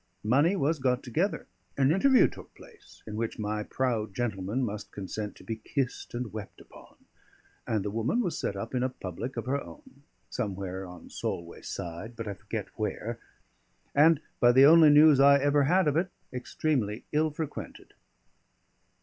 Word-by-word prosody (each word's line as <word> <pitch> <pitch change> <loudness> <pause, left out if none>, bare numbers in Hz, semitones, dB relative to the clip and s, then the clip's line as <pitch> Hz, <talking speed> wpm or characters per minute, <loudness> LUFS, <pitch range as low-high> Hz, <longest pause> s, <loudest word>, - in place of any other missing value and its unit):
Money 140 - +3
was 155 -2 0
got 130 -1 0
together; 165 - -1 0.3
an 135 +1 +4
interview 255 +9 +5
took - - -13
place, - - -17
in 105 - -7
which 115 +1 -3
my 105 0 -2
proud 110 -3 -2
gentleman 110 +1 -2
must 105 -3 -5
consent 105 +1 -5
to - - -15
be 115 - -4
kissed 125 +2 -3
and 120 -3 -4
wept 105 -2 -8
upon; - - -16 0.7
and 110 -3 -1
the 105 - -2
woman 115 - 0
was 180 -9 -1
set 100 - -3
up 110 +5 -6
in 125 - 0
a 130 - +1
public 120 +2 -6
of 115 - -3
her 140 +2 -1
own, 280 - -15 0.3
somewhere 95 -5 -4
on 90 -1 -12
Solway 85 0 -5
side 90 +7 -6
(but 115 -1 -6
I 100 - -3
forget 95 - -6
where), - - -3 0.7
and, 155 +1 +5 0.2
by 120 - +6
the 130 +2 +7
only 160 +1 +8
news 150 -1 +7
I 140 +1 +7
ever 145 0 +3
had 180 +3 +3
of 150 - +2
it, 175 +3 +1 0.2
extremely 125 -4 -2
ill 155 +1 +2
frequented. 155 0 -7
125 Hz, 170 wpm, -28 LUFS, 105-150 Hz, 0.7 s, only